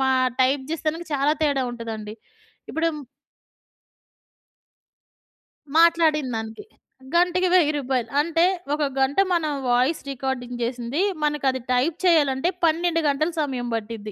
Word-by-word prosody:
మా 265 - +2 0.3
టైప్ 265 +2 +2
చేస్తానికి 325 +1 -2
చాలా 285 +1 +2
తేడా 280 -3 +2
ఉంటదండి. 220 -3 -6 0.6
ఇప్పుడు 330 +1 0 2.9
మాట్లాడిందానికి. 305 - +2 0.5
గంటకి 360 +1 +3
1000 330 -5 +5
రూపాయలు. 255 -4 -2
అంటే 330 +2 +2 0.3
ఒక 300 0 0 0.2
గంట 270 +4 +1 0.2
మనం 320 -3 0 0.2
వాయిస్ 250 +6 +2
రికార్డింగ్ 250 -2 -4
చేసింది. 245 +5 -2 0.2
మనకది 275 -3 0
టైప్ 270 +6 +1
చేయాలంటే 295 -2 +3 0.2
12 330 +1 +1
గంటల 310 +4 0
సమయం 255 -4 -3
పట్టిద్ది. 220 -1 -6
280 Hz, 105 wpm, -23 LUFS, 245-325 Hz, 2.9 s, 1000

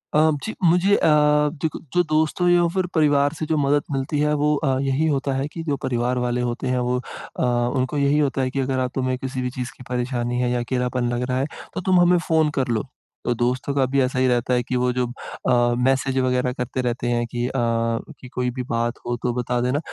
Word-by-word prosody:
अ, 155 +1 +5
जी। 220 - -4
मुझे 180 +4 +4
अ, - - +2 0.5
देखो 160 - -2
जो 175 0 +4
दोस्त 155 +3 +1
हो 175 - +3
या 175 -1 +4
फिर 185 -1 +1
परिवार 145 -2 +3
से 160 - -4
जो 155 0 0
मदद 145 0 +2
मिलती 135 +2 -1
है 150 0 +2
वो 150 0 +3
अ, 135 -3 0
यही 140 +3 +1
होता 140 -2 0
है 135 +2 -1
कि 165 - -5
जो 145 - +1
परिवार 125 0 0
वाले 125 0 0
होते 120 - -5
हैं 125 0 +1
वो 125 - +1
अ, - - -7 0.3
उनको 130 +3 -1
यही 140 +1 +2
होता 140 -2 +1
है 130 - 0
कि 135 - -2
अगर 130 0 0
अब 125 -1 -1
तुम्हें 130 -1 0
किसी 130 0 -4
भी 125 - -1
चीज़ 125 -1 -5
की 125 - -11
परेशानी 125 -1 -1
है 125 -1 +1
या 125 - 0
अकेलापन 125 0 -1
लग 120 +1 -1
रहा 125 - 0
है 135 - +1 0.3
तो - - -2
तुम 185 0 +3
हमें 175 0 +5
फ़ोन 160 -2 +2
कर 130 - 0
लो। 115 +1 -1 0.4
तो 120 - +2
दोस्तों 125 +3 0
का 135 -2 +3
भी 135 +2 0
ऐसा 130 0 0
ही 130 - +3
रहता 125 0 +1
है 125 0 +2
कि 125 - -3
वो 125 0 +2
जो 125 0 0
अ, - - -8 0.7
मैसेज़ 135 +1 +1
वग़ैरह 125 -1 +1
करते 125 0 -3
रहते 120 0 -2
हैं 120 0 +1
कि 120 0 -2
अ, - - -4 0.7
कि 125 - -11
कोई 125 0 0
भी 125 +1 -4
बात 115 0 0
हो 120 - -1
तो 125 - 0
बता 125 0 -1
देना, 125 +4 +1
130 Hz, 245 wpm, -22 LUFS, 125-145 Hz, 0.7 s, अ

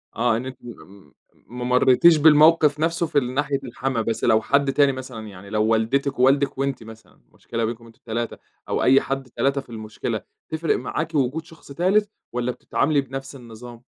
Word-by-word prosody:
آه، 115 -1 +1
إن 120 - -5
أنتِ 130 -1 -7
م 95 -6 -13 0.4
ما 125 +4 -7
مريتيش 125 +6 +5
بالموقف 150 0 +5
نفسْه 165 +2 0
في 145 - +2
ناحية 140 +2 -2
الحما، 130 -1 -3
بس 115 0 -3
لو 110 0 +4
حد 140 +4 +1
تاني 140 -1 +4
مثلًا 130 -4 -8
يعني 100 -1 -12
لو 105 +1 +1
والدتِك 115 +5 0
ووالدِك 135 +2 +3
وأنتِ 135 -3 -2
مثلًا، 110 0 -15
المشكلة 115 -1 -4
بينكم 115 +1 -6
أنتم 115 -1 -18
ال3، 115 0 -4 0.3
أو - - 0
أي 135 +1 +5
حد 135 -1 -4
3 140 +3 0
في 135 - -22
المشكلة 110 -2 -5 0.3
تفرق 160 +1 0
معاكِ 155 +5 -4
وجود 145 +3 0
شخص 165 -3 -16
تالت 195 +7 +1 0.2
والّا 125 0 -2
بتتعاملي 145 +3 0
بنفس 135 +1 -8
النظام؟ 120 -1 -12
130 Hz, 175 wpm, -22 LUFS, 115-140 Hz, 0.4 s, مريتيش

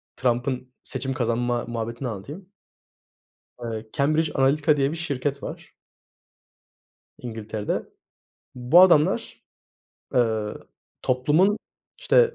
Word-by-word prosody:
Trump'ın 125 +1 -1
seçim 135 -1 -3
kazanma 120 -1 0
muhabbetini 115 +2 -4
anlatayım. 145 - -7 1.1
Eee, 110 -1 -5
Cambridge 155 +2 +2
Analytica 145 +3 +3
diye 140 0 +2
bir 165 - -4
şirket 140 -4 -2
var - - -8 1.5
İngiltere'de. 110 -3 -4 0.7
Bu 125 +8 +6
adamlar, 185 +4 +3 0.7
eee, 110 -4 +1 0.5
toplumun, 150 +11 +3 0.4
işte, 485 -2 +4
130 Hz, 90 wpm, -24 LUFS, 120-155 Hz, 1.5 s, Bu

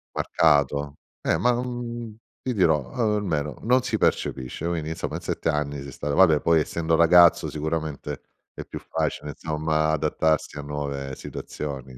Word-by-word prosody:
Marcato, 70 -2 +2 0.3
eh, - - +1
ma, 125 0 +3
mh, 120 -3 -5 0.3
ti 125 -2 -2
dirò, 80 -6 +2
almeno 105 - -1
non 125 +2 +3
si - - -1
percepisce, 65 +5 -1
quindi 80 -3 -2
insomma 80 - -4
in - - -5
7 - - -2
anni 75 -2 -1
sei 70 -2 -9
stato 70 +1 -3
vabbè 80 -5 +5
poi 85 -1 +4
essendo 80 +1 0
ragazzo, 85 +1 +6
sicuramente 75 -2 -4 0.4
è - - -5
più - - -8
facile, 75 - -3
insomma, 80 +1 -1
adattarsi 80 0 0
a - - -5
nuove 70 -2 -4
situazioni 65 -3 -7
80 Hz, 150 wpm, -25 LUFS, 75-85 Hz, 0.4 s, ragazzo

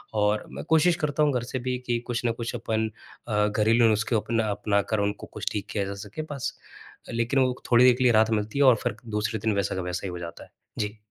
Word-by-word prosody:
और 105 0 +1
मैं - - -6
कोशिश 160 +2 +4
करता 150 +1 +1
हूँ 145 -2 +3
घर 125 -2 0
से 130 +2 -4
भी 125 +1 -2
कि 120 -1 +1
कुछ 120 -1 -2
ना 115 - +3
कुछ 115 0 -4
अपन 110 0 -1 0.4
अ, 105 -2 +2
घरेलू 110 +2 +3
नुस्खे 110 +2 +1
अपना 115 +1 0
अपना, 100 0 +1
कर 110 +1 -2
उनको 100 0 -2
कुछ - - -3
ठीक 105 -1 -3
किया 100 -2 -1
जा 100 - -4
सके 110 +10 -6
बस। 140 -3 -6 0.7
लेकिन 115 +4 +1
वो 130 -1 +2 0.2
थोड़ी 120 +1 +7
देर 125 - +7
के 130 - -1
लिए 125 - +5
राहत 110 0 +4
मिलती 110 +4 -1
है 140 - +6
और 130 -2 +7
फिर - - -1 0.2
दूसरे 105 +1 -1
दिन 110 +1 0
वैसा 100 -1 0
का 95 - -2
वैसा 90 +1 -4
ही - - -4
हो 90 - -6
जाता 85 -1 -8
है। - - -17 0.3
जी। 105 0 -2
110 Hz, 255 wpm, -26 LUFS, 105-125 Hz, 0.7 s, थोड़ी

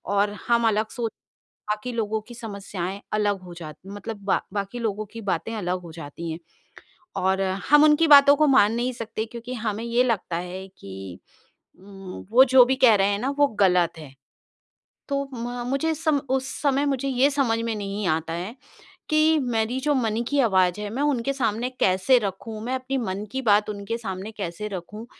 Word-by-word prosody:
और 205 +1 +2 0.2
हम 235 -1 +3
अलग 215 0 +1
सोच 230 -2 -3 0.6
बाकी 215 +4 -2
लोगों 220 -2 -1
की 240 - -10
समस्याएँ 200 -4 -5
अलग 205 -2 +1
हो 175 -1 -10
जाती 165 +1 -10
मतलब 205 +2 -6
ब - - +3
बाकी 200 +3 -3
लोगों 215 -2 -2
की 230 - -7
बातें 200 +3 -2
अलग 180 -3 -2
हो 170 -2 -10
जाती 165 +1 -7
हैं। 160 - -5 0.8
और 190 +1 +1 0.3
हम 295 +1 +7
उनकी 305 +2 +5
बातों 285 -1 +8
को 305 +1 +3
मान 225 -6 +5
नहीं 245 +2 -1
सकते 225 -2 -4
क्योंकि 235 +2 -8
हमें 220 -2 -3
ये 235 +1 +2
लगता 225 -8 -1
है 180 +2 -6
कि 95 -2 -9 0.6
उम, 195 -1 -10
वो 250 +4 +7
जो 260 -1 +9
भी 260 +2 0
कह 230 - +8
रहे 195 -1 +3
हैं 200 0 0
ना, 255 +6 -1
वो 290 - +6
गलत 180 -7 +2
है। 145 -4 -11 1.0
तो 280 0 0
म 245 0 -4
म - - +2 0.2
सम 315 -1 +1
उस 265 0 0
समय 280 -1 +2
मुझे 275 -1 -1
ये 265 +1 +3
समझ 270 -6 +1
में 230 -1 -1
नहीं 200 0 -4
आता 160 0 -1
है 180 +7 -5 0.6
कि 310 +1 +4
मेरी 235 0 -1
जो 295 +2 +1
मन 230 -3 0
की 285 -1 +2
आवाज 190 -6 +3
है, 210 - -4
मैं 255 +6 -2
उनके 275 -3 +1
सामने 245 -3 -1
कैसे 190 +8 +4
रखूँ? 215 +1 -5
मैं 250 +2 -2
अपनी 260 +1 -3
मन 200 -4 -3
की 265 0 -2
बात 210 -2 +3
उनके 205 +3 -4
सामने 195 -2 -5
कैसे 195 +2 -4
रखूँ 205 +3 -7
220 Hz, 190 wpm, -24 LUFS, 195-255 Hz, 1.0 s, जो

